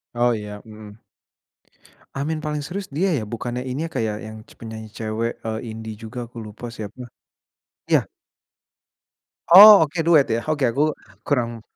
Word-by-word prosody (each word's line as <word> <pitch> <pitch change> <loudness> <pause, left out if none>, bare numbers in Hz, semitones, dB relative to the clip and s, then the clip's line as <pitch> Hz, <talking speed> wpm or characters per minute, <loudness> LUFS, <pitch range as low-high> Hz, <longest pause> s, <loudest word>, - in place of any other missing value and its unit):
Oh 120 0 +2
ya, 105 -2 -5
mmm. 105 -1 -12 1.2
Amin 150 +3 -2
Paling 150 -1 -3
Serius 190 +5 -6
dia, 190 +6 +1
ya? 110 - -3
Bukannya 120 +3 -5
ini, 130 +5 -3
Kak, 130 - -2
ya 105 - -2
yang 110 0 -9 0.2
penyanyi 110 -1 -8
cewek, 115 +1 -2
eee, 110 0 -3
indie 110 0 -7
juga, 115 +3 -9
aku 120 - -15
lupa 105 +3 -10
siapa 110 +1 -9 0.9
iya. - - +3 1.5
Oh, 205 -3 +11
oke, 165 +3 -3
duet, 160 -4 +4
ya? 115 +1 -1
Oke, 145 -4 +1
aku 120 +5 +1 0.4
kurang 120 -5 -2
120 Hz, 150 wpm, -22 LUFS, 110-150 Hz, 1.5 s, Oh